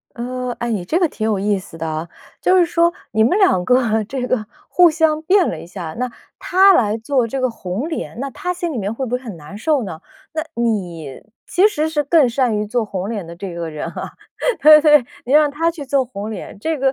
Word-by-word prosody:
嗯， 250 +1 -4
诶， 235 - -2
你 195 -5 -2
这 320 - 0
个 350 - +3
挺 220 - -5
有 215 -2 +1
意 200 +1 +1
思 175 -3 -12
的 165 - -3
啊。 160 +2 -4 0.3
就 370 0 +4
是 350 - +4
说 340 0 +2 0.2
你 220 0 +3
们 360 - +2
两 365 - +3
个 225 -2 +2
这 250 +3 -4
个 245 -4 -1 0.2
互 355 -2 +5
相 315 -1 +1
变 370 +2 +3
了 165 - -4
一 - - -10
下， 170 -3 -7
那 250 -1 -2 0.3
他 385 +2 +5
来 215 -5 +2
做 255 +1 0
这 265 +4 -3
个 255 - +2
红 210 - -4
脸， 320 -7 -5
那 275 - -2
他 360 +6 -3
心 345 -2 -3
里 250 - -3
面 205 +1 -2
会 265 +3 -3
不 240 - -7
会 250 - -10
很 215 -8 -7
难 155 +5 -11
受 295 +4 +1
呢？ 160 -4 -7 0.3
那 315 -1 -2 0.2
你 175 - -3 0.2
其 370 +3 +4
实 315 -7 0
是 300 -2 -1
更 290 -2 +4
善 240 -2 +1
于 210 - -2
做 230 +1 0
红 195 -1 -4
脸 205 -6 -4
的 170 - -9
这 180 0 -7
个 170 -1 -4
人 155 - -5
啊， - - -7 0.5
对 305 0 +9
对， 300 -4 +6 0.2
你 255 - -3
让 300 0 +5
他 330 +4 0
去 315 -4 -8
做 270 0 +2
红 215 -4 -6
脸， 210 -2 -8
这 320 +7 -2
个 270 0 +2
250 Hz, 260 characters per minute, -19 LUFS, 205-310 Hz, 0.5 s, 对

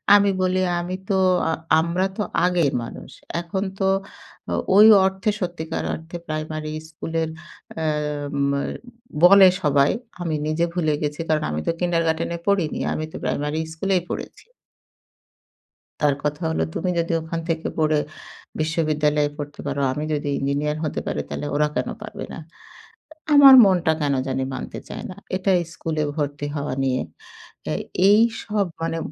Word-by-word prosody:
আমি 200 0 +5
বলি 185 0 +1 0.2
আমি 180 +1 -4
তো 195 - +2 0.3
আ - - +2 0.3
আমরা 175 +3 0
তো 210 - 0 0.2
আগের 175 -6 +2
মানুষ। - - -9 0.3
এখন 180 +3 -3 0.2
তো 195 - +2 0.7
ও - - +1 0.2
ওই 210 +2 +9 0.2
অর্থে 190 +2 0
সত্যিকার 170 -3 -3
অর্থে 165 +2 -8
প্রাইমারি 155 0 -4 0.2
স্কুলের 160 0 -3 0.5
আ - - -1 0.7
মা 140 - 0 0.6
বলে 195 +1 +9 0.2
সবাই। 140 -1 +4 0.3
আমি 165 -3 -1
নিজে 155 +2 +1
ভুলে 155 -4 +1
গেছি। 150 +1 -2
কারণ 155 -1 +2
আমি 75 +1 -2
তো - - +4
কিন্ডারগার্টেনে 165 -1 0
পড়িনি। 190 -6 +1
আমি 155 - -3
তো - - -11
প্রাইমারি 150 +2 -1
স্কুলেই 185 +1 0
পড়েছি। - - -7 1.6
তার 145 -2 +3
কথা 150 +3 -2
হলো, 160 - 0
"তুমি 185 - -1
যদি 170 0 0
ওখান 160 +1 -4
থেকে 165 0 -1
পড়ে 155 -1 +3 0.6
বিশ্ববিদ্যালয়ে 150 -2 +1
পড়তে 145 0 -7
পারো, 140 0 -2
আমি 150 +3 -3
যদি 145 -1 -1
ইঞ্জিনিয়ার 145 +2 -1
হতে 150 - -2
পারি - - -2
তাইলে 145 - -4
ওরা 150 +1 +2
কেনো 125 - -2
পারবে - - -7
না?" - - -7 0.9
আ - - -1
আমার 275 -2 +10
মনটা 180 -4 +3
কেনো 140 -2 +1
জানি 130 0 -1
মানতে - - -6
চায় - - -7
না। - - -8 0.2
এটাই 185 -1 +2
স্কুলে 155 -2 -2
ভর্তি 145 -1 -2
হওয়া 145 -2 -2
নিয়ে। 130 -1 +1 0.6
তা - - -3 0.4
এইসব 215 -1 +2 0.2
মানে 165 0 -1
160 Hz, 150 wpm, -23 LUFS, 150-180 Hz, 1.6 s, আমার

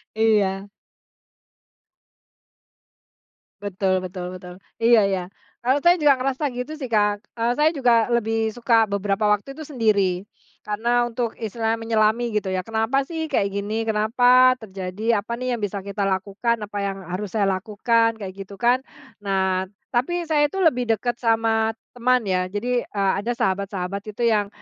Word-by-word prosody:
Iya. 205 -3 +1 2.9
Betul 190 -2 0
betul 180 -1 -6
betul, 180 -1 -10 0.2
iya 230 -2 +5
iya, 190 -2 0 0.4
kalau 260 +4 +1
saya 350 0 +5
juga 290 -2 +5
ngerasa 270 +3 -1
gitu 250 +3 -5
sih 260 - -4
Kak, 210 -2 +2 0.2
eee, 230 +1 +1
saya 300 +5 +3
juga 240 -4 +3
lebih 225 -2 +1
suka 230 -2 +3
beberapa 200 +1 0
waktu 210 +6 0
itu 305 +1 -10
sendiri, 205 -8 +1 0.4
karena 235 +3 +1
untuk 240 -1 -3
istilahnya 225 0 -2
menyelami 225 +1 +1
gitu 210 -2 -1
ya 185 -1 -2
kenapa 225 +6 0
sih 320 +2 -4
kayak 200 -8 0
gini, 210 +3 -2
kenapa 245 +4 +4
terjadi 200 +3 -2
apa 235 +3 -5
nih 255 +1 -2
yang 235 - -2
bisa 200 -1 -3
kita 200 0 -2
lakukan, 195 +5 -1
apa 205 0 -9
yang 195 -1 -4
harus 180 +4 -4
saya 210 - +3
lakukan 220 +4 +1
kayak 195 -4 -7
gitu 195 +1 -10
kan, 245 +4 +3 0.4
nah 190 -2 0 0.2
tapi 340 +8 0
saya 300 -2 +2
itu 335 - -9
lebih 250 -7 +2
dekat 240 +1 -3
sama 225 -1 +1 0.2
teman 250 0 +1
ya 185 -2 0
jadi, 240 +5 -2
eee, 195 -2 +1
ada 235 +3 -3
sahabat-sahabat 200 -2 -2
itu 215 +3 -3
yang, 210 -3 +2
220 Hz, 155 wpm, -23 LUFS, 200-240 Hz, 2.9 s, iya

